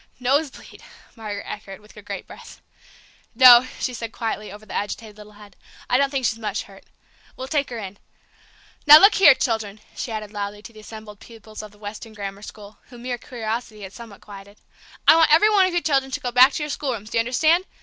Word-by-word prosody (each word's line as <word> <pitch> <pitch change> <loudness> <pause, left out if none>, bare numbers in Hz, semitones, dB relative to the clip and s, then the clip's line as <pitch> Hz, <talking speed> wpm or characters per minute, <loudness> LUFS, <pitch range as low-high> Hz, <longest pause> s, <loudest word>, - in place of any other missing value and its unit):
"Nosebleed!" 275 +3 -2 0.3
Margaret 210 -3 -7
echoed, 195 -2 -9
with 210 0 -20
a 210 - -12
great 205 - -8
breath. - - -14 0.8
"No," 255 -1 +8
she 255 - -3
said 230 -1 -6
quietly, 220 -3 -5
over 210 +2 -13
the 190 - -11
agitated 210 +1 -5
little 210 0 -15
head; 205 -2 -17 0.4
"I 250 - +3
don't 280 0 +2
think 270 -2 -3
she's 225 0 -1
much 210 -1 -4
hurt. 195 -1 -17 0.5
We'll 260 - -7
take 285 0 -1
her 240 - -7
in. 200 -2 -9 0.9
Now, 300 +1 +12
look 400 +6 +6
here, 290 -9 +6
children," 220 -5 -3 0.2
she 240 - -5
added 215 -1 -6
loudly 205 0 -6
to 230 - -12
the 215 - -14
assembled 215 -1 -12
pupils 220 -2 -12
of 215 - -11
the 205 - -22
Weston 215 +2 -9
Grammar 200 -1 -7
School, 210 0 -13
whom 240 -2 -13
mere 245 -1 -4
curiosity 225 -2 -6
had 190 0 -10
somewhat 230 -4 -13
quieted, 200 0 -13 0.5
"I - - +8
want 325 -2 +4
every 420 +8 +5
one 390 -3 +4
of 370 - -5
you 350 - +1
children 270 -4 0
to - - -2
go 245 - -4
back 255 +3 +6
to 300 - -3
your 300 - -5
schoolrooms; 240 -8 -5
do 230 - 0
you - - +4
understand? 315 +9 +1
225 Hz, 215 wpm, -22 LUFS, 210-260 Hz, 0.9 s, Now